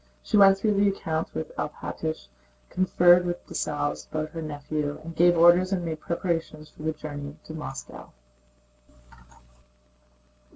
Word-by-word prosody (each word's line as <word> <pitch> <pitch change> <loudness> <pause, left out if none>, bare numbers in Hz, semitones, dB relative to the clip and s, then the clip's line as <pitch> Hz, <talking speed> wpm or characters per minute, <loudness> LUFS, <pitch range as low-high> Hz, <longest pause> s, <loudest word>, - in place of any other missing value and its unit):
She - - -1
went 195 -1 +7
through 210 +2 +1
the 200 0 +3
accounts 160 -4 -3
with 80 - -5
Alpátych, - - -4 0.4
conferred 180 -1 +5
with 175 0 -4
Dessalles 145 -1 -3
about 155 0 -4
her 165 - -6
nephew, 145 -1 -4
and 165 0 -8
gave 175 0 +5
orders 175 +3 +6
and 180 -3 -1
made 160 -1 -4
preparations 165 -3 -3
for - - -15
the 160 +1 0
journey 145 -1 -7
to 155 - -9
Moscow. 150 -4 -8
165 Hz, 135 wpm, -26 LUFS, 150-175 Hz, 0.4 s, went